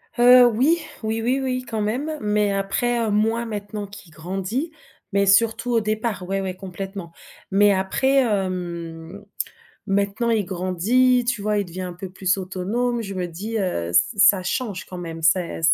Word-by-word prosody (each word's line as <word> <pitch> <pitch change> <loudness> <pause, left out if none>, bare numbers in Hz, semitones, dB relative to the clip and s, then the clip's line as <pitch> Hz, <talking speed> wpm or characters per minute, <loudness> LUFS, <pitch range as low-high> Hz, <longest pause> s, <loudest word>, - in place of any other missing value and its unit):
Heu, 245 +1 +8
oui, 265 +9 +2 0.2
oui, 220 +1 -1
oui, 250 +4 +1
oui, 255 -1 -1
quand 220 -2 -2
même. 275 +9 -2
Mais 210 -1 +1
après, 200 +5 0
heu, 215 - -1
moins 225 +3 +1
maintenant 205 -1 -5
qu'il 200 -4 -13
grandit, 195 - -4 0.4
mais 200 0 +3
surtout 225 +5 +3
au 230 - +4
départ. 215 -2 -2
Ouais, 195 +1 -1
ouais 190 -1 -4
complètement. 190 -1 -7 0.4
Mais 205 +1 +5
après, 200 +8 +1
hem, 180 -3 -3 0.6
maintenant, 200 +3 0
il 220 -3 +2
grandit, 200 +8 +2
tu 240 -4 -1
vois, 210 0 +1
il 205 - 0
devient 185 +1 -7
un 180 -1 -5
peu 180 +2 -8
plus 190 +1 0
autonome. 210 +6 -2
Je 195 -2 -6
me 180 -1 -2
dis: 205 +7 -4
«Heu 85 - -2
ce 205 - +2
ça 195 -1 +6
change 200 0 -3
quand 180 - -8
même. 165 -2 -7
C'est 170 +1 +1
200 Hz, 170 wpm, -22 LUFS, 185-230 Hz, 0.6 s, Heu